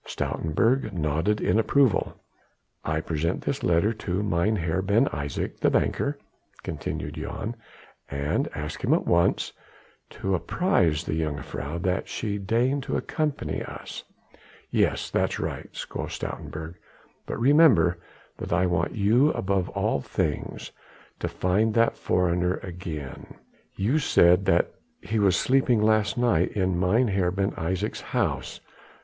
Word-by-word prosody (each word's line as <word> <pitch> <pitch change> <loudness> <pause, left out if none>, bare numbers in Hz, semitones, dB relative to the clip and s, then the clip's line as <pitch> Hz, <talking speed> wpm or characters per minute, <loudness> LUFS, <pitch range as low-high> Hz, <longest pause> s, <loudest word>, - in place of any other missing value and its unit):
Stoutenburg 115 - 0
nodded 80 +5 0
in 110 - +2
approval. 130 -1 +2 0.6
"I 80 0 -1
present 80 +2 -1
this 140 0 -2
letter 85 +6 +2
to 95 -2 -2
Mynheer 85 -2 +1
Ben 100 +7 +3
Isaje, 70 +1 -4
the - - +3
banker," - - 0 0.5
continued 75 +2 -4
Jan, 100 +8 -5 0.5
"and 70 +2 -1
ask 75 +1 -5
him - - +4
at - - -1
once 85 0 +2 0.6
to 95 - -3
apprise 90 - +1
the - - -3
jongejuffrouw 75 +1 -4
that 90 +1 0
she 105 -2 -3
deign 120 +8 +1
to - - -2
accompany 155 -3 -2
us." - - -7 0.7
"Yes. - - +1
That - - +1
is - - -4
right," - - -5
quoth - - -5
Stoutenburg, 80 +3 -6 0.5
"but - - -4
remember 120 - +5 0.4
that - - -6
I 90 +2 +3
want 90 0 0
you 115 +7 +4
above 95 -1 0
all 70 - 0
things 75 +2 -3 0.5
to - - -2
find 105 +5 +1
that 115 0 +3
foreigner 90 0 +1
again. 85 -7 -7 0.4
You 115 +11 +1
said 90 - +4
that 85 - +3 0.3
he 110 0 -2
was 100 -3 +4
sleeping 125 -3 +3
last 110 0 +2
night 115 -8 +2
in 95 -3 0
Mynheer 95 -1 +2
Ben 95 +2 0
Isaje's 95 +6 -3
house." - - -2
95 Hz, 130 wpm, -26 LUFS, 85-110 Hz, 0.7 s, remember